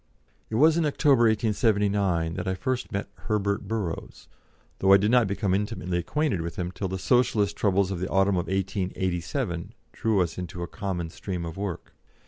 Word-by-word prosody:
It 110 - -3
was 155 +6 +5
in 170 - +2
October, 140 -4 +4
1879, 100 -6 +2
that - - -4
I 95 - 0
first 125 +7 -2
met 100 0 -3 0.2
Herbert 100 -1 0
Burrows, 105 -7 -4 0.5
though 95 0 +5
I - - +9
did 105 +3 +1
not 120 -3 +5
become 100 -1 0
intimately 95 -3 -1
acquainted 135 - 0
with 85 0 -5
him 90 -1 -3
till 95 +2 -3
the 95 +1 -3
Socialist 105 -1 +2
troubles 100 -1 +2
of 95 - -3
the 95 - -3
autumn 95 0 +3
of 90 - -1
1887 95 - -2 0.2
drew 110 -4 +1
us 90 0 -2
into 90 0 -5
a - - -4
common 90 -5 -4
stream 90 -2 -5
of 80 0 -6
work. 95 -4 -5
100 Hz, 180 wpm, -26 LUFS, 90-110 Hz, 0.5 s, I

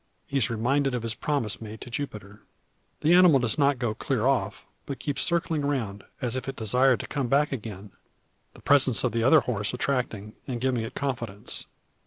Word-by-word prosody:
He 140 - -2
is 120 - +1
reminded 130 +4 +1
of 120 - -3
his 115 -1 -1
promise 115 -8 -1
made 110 0 -8
to 120 - -9
Jupiter. 105 -6 -6 0.6
The 160 +3 +4
animal 180 -5 +7
does 120 +1 0
not 140 -1 +3
go 120 -3 -1
clear 120 +1 -1
off, 135 -1 0 0.2
but 140 - -4
keeps 145 -3 -2
circling 170 -3 0
round, 115 -9 -2 0.2
as 120 0 0
if 130 +1 -3
it - - -5
desired 125 +4 +3
to - - -8
come 140 -4 -2
back 140 +4 +2
again; 105 -5 -6 0.6
the - - -15
presence 135 -6 +4
of - - +1
the 115 +2 -1
other 140 +6 +6
horse 110 -2 -2
attracting, 125 -6 -2
and 125 -3 -3
giving 125 -1 0
it 110 - -7
confidence. 120 -7 -3
125 Hz, 195 wpm, -27 LUFS, 110-140 Hz, 0.6 s, animal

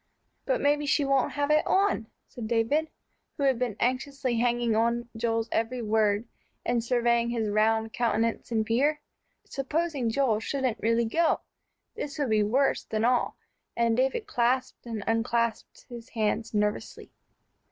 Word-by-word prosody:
"But - - +1
maybe 290 0 +2
she 285 0 +2
won't 275 -2 +1
have 290 0 0
it 305 0 +5
on," 385 - +2 0.2
said 235 -3 -7
David, 240 +8 +1 0.5
who 285 - -2
had 265 -3 +2
been 245 -5 -1
anxiously 255 0 -1
hanging 240 -1 +1
on 235 +2 +1
Joel's 225 0 -1
every 235 +2 -1
word, 215 0 +1 0.4
and 240 -1 +1
surveying 235 -1 +2
his 225 -3 -1
round 220 +1 +2
countenance 230 -1 0
in 220 -1 +1
fear. 280 +7 +1 0.5
Supposing 285 -2 -1
Joel 225 -3 +1
shouldn't 255 -1 -2
really 230 +1 +2
go! 325 +8 +1 0.5
This 285 - -6
would 280 -6 -1
be 215 -1 +4
worse 250 +7 +2
than 220 0 -1
all, 245 0 +1 0.4
and 230 -1 +2
David 265 - 0
clasped 250 - -1
and 220 -3 -4
unclasped 230 0 -1
his 235 -1 -10
hands 225 0 -1
nervously. 210 -1 -2
235 Hz, 150 wpm, -27 LUFS, 225-270 Hz, 0.5 s, it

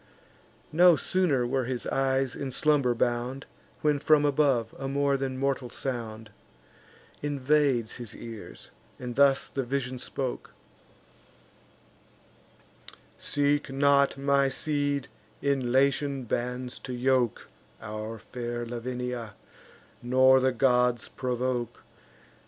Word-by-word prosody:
No 175 +2 +6
sooner 155 -9 +1
were 130 +1 0
his 125 0 -3
eyes 135 -1 0
in 140 - -4
slumber 140 -2 +2
bound, 120 +3 -1 0.4
When, 150 -1 +2
from 150 0 +4
above, 135 -6 +2
a 135 - -3
more 140 0 +1
than 135 -1 -3
mortal 135 -2 -1
sound 115 -4 -5 0.9
Invades 140 -4 +1
his 120 -4 -7
ears; 115 -2 -9 0.3
and 125 -1 -6
thus 140 -1 +4
the 135 - -3
vision 130 0 -3
spoke: 130 0 -5 2.6
"Seek 145 0 0
not, 140 0 +3
my 140 0 +2
seed, 145 0 -1 0.3
in 135 -3 0
Latian 140 +1 +2
bands 125 +2 -3
to 130 - -7
yoke 125 -1 +1 0.3
Our 110 +1 -6
fair 120 +1 -5
Lavinia, 120 -1 -5 0.7
nor 130 +2 +5
the 130 0 +2
gods 125 -2 +2
provoke. 125 -1 -3
130 Hz, 105 wpm, -28 LUFS, 120-140 Hz, 2.6 s, No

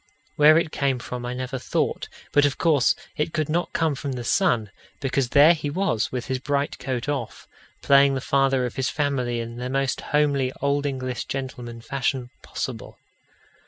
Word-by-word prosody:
Where 155 +1 +7
it 165 -2 0
came 135 -2 0
from 125 0 -6
I 125 - -4
never 130 +1 -4
thought, - - -1 0.2
but 145 - +5
of 145 -1 +1
course 150 -7 +3 0.2
it 150 +1 -1
could 155 -2 -1
not 175 +3 0
come 160 -2 +1
from 140 0 -4
the 125 -1 -5
sun, 120 - +1 0.3
because 135 -2 0
there 150 +6 +7
he 150 -3 -4
was, 165 - 0
with 125 -2 -3
his 130 -1 -2
bright 140 +1 -1
coat 130 -1 -3
off, 140 -6 -4 0.4
playing 140 0 +5
the - - -1
father 135 -2 +2
of 125 - -6
his 130 -1 0
family 130 -5 -1
in 115 0 -6
the 125 +1 -4
most 135 0 -1
homely 140 -3 +1
Old 140 +1 0
English 130 -4 -3
gentleman 125 -3 -6
fashion 130 0 -2
possible. - - -6
135 Hz, 180 wpm, -24 LUFS, 125-145 Hz, 0.4 s, Where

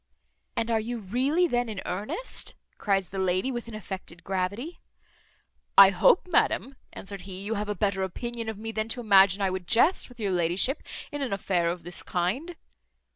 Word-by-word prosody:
"And 230 +1 -1
are 225 - +3
you 235 +2 -3
really 255 - +1
then 245 -6 0
in 210 -3 -4
earnest?" 210 - -3 0.2
cries 195 -3 +1
the 195 - -5
lady, 190 +7 +1
with 240 -2 -5
an 230 - -8
affected 190 -4 -8
gravity. 200 - -3 1.0
"I 195 -1 +10
hope, 190 - +4
madam," 275 -5 +1 0.2
answered 200 -1 -4
he, 190 0 -7
"you 210 +3 -2
have 210 -1 -3
a 210 - -1
better 195 -1 0
opinion 230 +5 -4
of 220 - -5
me, 225 +1 -5
than 220 0 -2
to 245 - -1
imagine 200 -3 +5
I 190 - +2
would 185 -1 -5
jest 290 - +3
with 245 - -16
your 205 -3 -1
ladyship 180 - +1 0.3
in 290 - -4
an 270 - -2
affair 180 -3 0
of 170 0 -4
this 175 +1 -5
kind." 230 - -2
205 Hz, 185 wpm, -27 LUFS, 190-240 Hz, 1.0 s, I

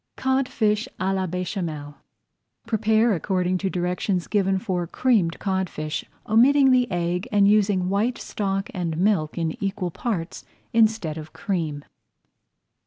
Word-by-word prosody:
CODFISH 250 -4 +1
À 190 +1 0
LA 190 -1 -1
BÉCHAMEL 170 -5 -4 0.7
Prepare 220 +1 +2
according 185 0 0
to 195 - -1
directions 180 0 -1
given 195 -2 +1
for 185 -4 -2
Creamed 205 -7 +1
Codfish, 185 -6 -2 0.2
omitting 265 +5 +5
the 250 -1 +3
egg 175 +3 -1
and 200 -1 +4
using 200 -3 +3
white 210 +6 0
stock 195 -1 -3
and 170 -4 -2
milk 180 -5 +1
in 165 +2 -2
equal 190 -2 -2
parts 180 -5 -4 0.3
instead 215 -8 +2
of 155 0 -10
cream. 160 -4 -3
190 Hz, 125 wpm, -24 LUFS, 175-215 Hz, 0.7 s, omitting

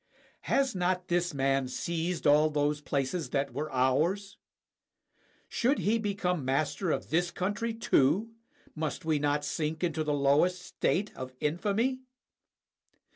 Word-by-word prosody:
Has 275 -2 +2
not 180 0 -1
this 175 0 +1
man 135 -2 +1
seized 170 +5 -3
all 150 +2 +5
those 150 0 0
places 145 +4 -2
that 140 -2 -1
were 150 +4 -3
ours? 155 +11 +1 1.1
Should 265 +4 +1
he 225 +3 +1
become 195 -6 -1
master 145 +7 0
of - - -2
this 175 +2 +2
country 205 +6 -2
too, 220 -1 +2 0.4
must 155 +2 -4
we 155 -2 +2
not 145 0 0
sink 155 +3 -2
into 160 -2 0
the 150 - -1
lowest 145 +6 +3
state 190 +2 -1
of 130 0 -7
infamy? 205 - 0
160 Hz, 130 wpm, -30 LUFS, 145-185 Hz, 1.1 s, all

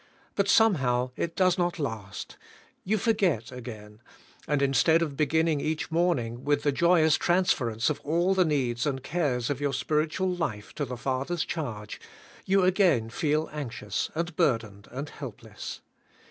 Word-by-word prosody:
But 200 0 0
somehow 130 - +3
it 165 - -3
does 185 -1 +3
not 175 0 0
last. 110 - -5 0.5
You 215 +3 +1
forget 185 - +1
again; 110 -4 -9 0.5
and 145 -2 +1
instead 160 +4 +4
of 150 -4 -4
beginning 160 +1 +2
eack 155 +1 -2
morning 135 -9 0
with 145 0 +1
the 145 - +3
joy 170 +3 +4
ous 160 -1 +4
transference 130 -11 +1
of 150 - 0
all 170 +5 +1
the 190 -1 +4
needs 130 -6 0
and 135 -2 -2
cares 140 -8 0
of 140 0 -3
your 140 -1 0
spiritual 155 +6 0
life 110 -13 -4
to 145 - -2
the 125 -1 -6
Father's 135 +7 -1
charge, 110 -10 -5 0.5
you 195 0 +4
again 175 - +3
feel 155 +5 0
anxious, 120 -8 -3
and 170 0 -2
burdened, 110 -8 0
and 135 +4 -5
helpless. 115 -5 -8
145 Hz, 155 wpm, -27 LUFS, 120-170 Hz, 0.5 s, instead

